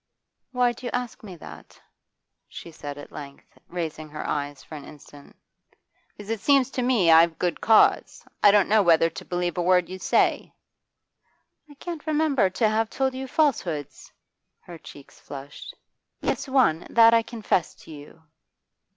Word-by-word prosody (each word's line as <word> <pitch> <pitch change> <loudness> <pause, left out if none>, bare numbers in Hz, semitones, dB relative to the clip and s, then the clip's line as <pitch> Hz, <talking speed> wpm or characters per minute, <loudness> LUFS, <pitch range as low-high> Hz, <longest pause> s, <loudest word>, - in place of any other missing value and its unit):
'Why 250 -1 +2
do 240 +1 -8
you - - -2
ask 245 -2 -4
me 190 -4 -9
that?' 165 - -13 0.7
she 170 - -11
said 145 -2 -8
at 145 - -11
length, 140 -1 -12
raising 160 -3 -6
her 150 - -7
eyes 145 -1 -4
for - - -14
an 150 -2 -8
instant. 145 -1 -15 0.8
'Because 210 +1 -8
it 225 - -2
seems 275 +1 +2
to 255 - -3
me 240 -9 +3
I've 165 0 +5
good 175 -2 -2
cause. 220 -1 +3 0.2
I 205 - +7
don't 200 -1 +4
know 215 0 +4
whether 165 -2 +3
to - - -9
believe 175 -1 -3
a - - +1
word 180 0 +2
you 185 0 -7
say.' - - 0 1.1
'I 290 - -15
can't 330 +1 -8
remember 295 -9 +1
to 220 +4 0
have 220 +1 0
told 265 +1 -1
you 265 +1 -6
falsehoods.' 170 - -2 0.5
Her 170 -2 -12
cheeks 140 -2 -15
flushed. 140 0 -10 0.5
'Yes, - - -3
one; 245 - +2
that 230 0 +6
I 230 - +5
confessed 220 -7 -3
to - - -14
you. 150 +2 -13
185 Hz, 165 wpm, -24 LUFS, 160-245 Hz, 1.1 s, I